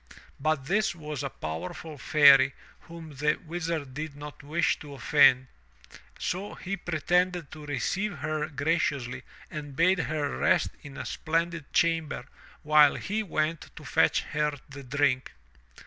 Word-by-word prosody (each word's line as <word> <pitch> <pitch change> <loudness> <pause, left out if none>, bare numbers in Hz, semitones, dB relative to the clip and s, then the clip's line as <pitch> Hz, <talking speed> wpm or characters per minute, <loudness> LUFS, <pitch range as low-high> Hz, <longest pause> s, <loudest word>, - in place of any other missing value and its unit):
But 155 -1 0
this 200 +3 +1
was 150 -3 -5
a 140 - -3
powerful 90 - -6
Fairy 140 -2 +6 0.3
whom 165 -2 -10
the 150 +2 +2
Wizard 160 -4 -3
did 150 +1 -5
not 145 0 -9
wish 155 +4 0
to 145 -2 -10
offend, 130 -2 +5 0.7
so 195 +4 -3
he 195 +2 -4
pretended 175 -1 0
to 155 -1 -10
receive 180 - -2
her 155 +2 -2
graciously 140 -4 -1 0.3
and 145 -2 -7
bade 185 +4 +3
her 150 -2 -2
rest - - +2
in 140 -1 -11
a - - -5
splendid 165 -1 -2
chamber 165 -6 +1 0.4
while 150 -1 +6
he 210 +3 -2
went 160 -5 -2
to - - -11
fetch - - +3
her 150 -1 -1
the 140 0 -10
drink. 135 -1 0
150 Hz, 140 wpm, -28 LUFS, 140-165 Hz, 0.7 s, Fairy